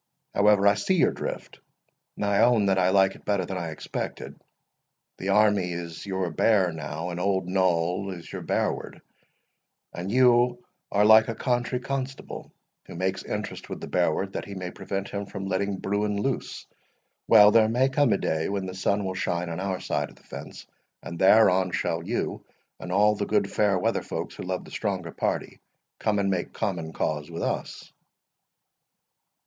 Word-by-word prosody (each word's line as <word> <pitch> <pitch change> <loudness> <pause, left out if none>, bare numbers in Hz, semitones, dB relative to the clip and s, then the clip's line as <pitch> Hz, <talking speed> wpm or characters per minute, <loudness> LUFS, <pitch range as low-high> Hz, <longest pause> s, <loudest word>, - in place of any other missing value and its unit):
However, 100 0 +4
I 100 - +7
see 105 - 0
your 170 - +4
drift, - - -6 0.6
and - - -2
I 100 -1 +2
own 120 -4 +4
that 95 -1 +2
I 90 0 +3
like 95 0 +4
it - - -16
better 100 -3 0
than 95 +1 -4
I 85 -1 -4
expected. 80 - -6 0.8
The 95 - -3
army 100 -3 +3
is 85 +2 -7
your 95 -3 -2
bear 95 +1 +3
now, 80 +2 -5
and 85 - -5
old 95 -1 0
Noll 90 0 +1
is 85 -3 -8
your - - -5
bearward; - - -2 0.9
and 90 +3 -5
you 125 0 +4 0.3
are 105 +1 +3
like 110 +1 +7
a 115 - -3
country 125 +1 -1
constable, 135 +1 -5 0.4
who - - -9
makes 95 +2 -1
interest 105 0 -5
with - - -5
the - - -6
bearward 90 +2 0
that - - -4
he 100 - -8
may 90 -1 -5
prevent 100 0 -5
him 100 -1 -4
from 95 -1 -6
letting 95 +1 -1
bruin 100 +1 -1
loose. 135 +4 -3 0.6
Well, 105 -2 +8
there 110 0 +5
may 125 +3 +3
come 135 -2 +2
a - - +3
day 80 -3 -1
when 100 -1 -2
the 95 - -6
sun 100 +2 0
will 95 - -2
shine 90 -2 -2
on 85 +1 -4
our 95 -1 -2
side - - -2
of - - -17
the - - -23
fence, - - -9 0.4
and 85 - -7
thereon 95 -2 +5
shall 85 0 -1
you, 115 +7 -3 0.4
and - - -7
all 105 +3 +4
the 100 -1 -3
good 105 -2 +1
fair 100 -3 +2
weather 90 - 0
folks - - -5
who - - -9
love 90 0 -4
the - - -13
stronger 95 -5 -3
party, - - -3 0.4
come 105 -2 +1
and 100 -1 +1
make 90 -2 -2
common 85 -5 -3
cause 75 -1 -2
with 85 0 -5
us." - - -4
95 Hz, 185 wpm, -26 LUFS, 90-105 Hz, 0.9 s, Well